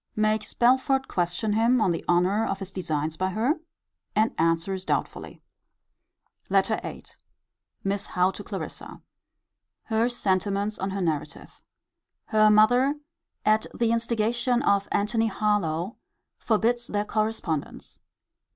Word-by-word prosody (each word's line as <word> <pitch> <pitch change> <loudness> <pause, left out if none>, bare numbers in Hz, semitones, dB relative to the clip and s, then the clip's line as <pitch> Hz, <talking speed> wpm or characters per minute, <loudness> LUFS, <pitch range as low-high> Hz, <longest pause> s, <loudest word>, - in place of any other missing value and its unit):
Makes 215 0 0
Belford 265 +2 +3
question 180 +5 -1
him 230 +3 +3
on 205 -5 +2
the 165 - -3
honour 180 +5 +3
of 195 - -2
his 195 -1 -7
designs 160 -4 -2
by 185 0 0
her: 235 - 0 0.6
and 220 +2 +2
answers 165 +3 +1
doubtfully. - - -3 1.1
LETTER - - +2
VIII. - - -7 0.8
Miss 200 0 -2
Howe 180 +1 +2
to - - -9
Clarissa. - - -7 0.8
Her 225 +1 +1
sentiments 200 -1 -1
on 190 - -2
her 195 0 -3
narrative. 160 -4 -4 0.6
Her 215 -1 +4
mother, 245 +7 +5 0.5
at 215 +1 +3
the 230 -1 +1
instigation 235 +2 0
of 200 -5 +2
Antony 225 +2 +1
Harlowe, 200 -3 -1 0.4
forbids 235 +2 +1
their 205 0 -1
correspondence. 215 -9 -3
210 Hz, 120 wpm, -26 LUFS, 185-230 Hz, 1.1 s, mother